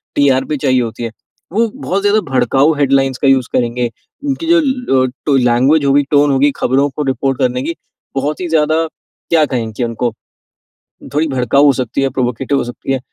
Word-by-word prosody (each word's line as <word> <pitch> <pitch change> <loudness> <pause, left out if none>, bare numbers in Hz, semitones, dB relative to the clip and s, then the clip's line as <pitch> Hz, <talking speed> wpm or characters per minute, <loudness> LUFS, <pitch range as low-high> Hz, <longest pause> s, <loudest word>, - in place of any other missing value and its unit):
TRP 140 +1 +2
चाहिए 130 -3 +1
होती 115 0 -5
है। 115 - -3 0.4
वो 230 +2 +2
बहुत 200 -8 -2
ज़्यादा 205 +1 +3
भड़काऊ 135 +4 +3
हेडलाइंस 135 -2 +1
का 140 - +2
यूज़ 130 -2 +3
करेंगे। 120 0 0 0.4
उनकी 285 +3 -2
जो 340 0 +5
लो 250 - +1 0.2
टो 145 - +2
लैंग्वेज 130 +5 +3
होगी 140 +1 +3
टोन 145 0 +4
होगी 140 +2 +3
खबरों 135 +3 +1
को 150 +2 -4
रिपोर्ट 135 0 -1
करने 125 0 0
की 170 - -3 0.4
बहुत 145 +4 -2
ही 180 - -2
ज़्यादा 155 -1 +2 0.5
क्या 160 -2 +4
कहें 120 -5 -3
कि 120 - -3
उनको, 115 0 -2 1.0
थोड़ी 160 +1 +2
भड़काऊ 135 +1 +2
हो 140 - +5
सकती 135 - -2
है, 135 - +1
प्रोवोकेटिव 130 +2 -1
हो - - -1
सकती 120 +2 -6
है। 130 - -1
135 Hz, 185 wpm, -15 LUFS, 125-150 Hz, 1.0 s, जो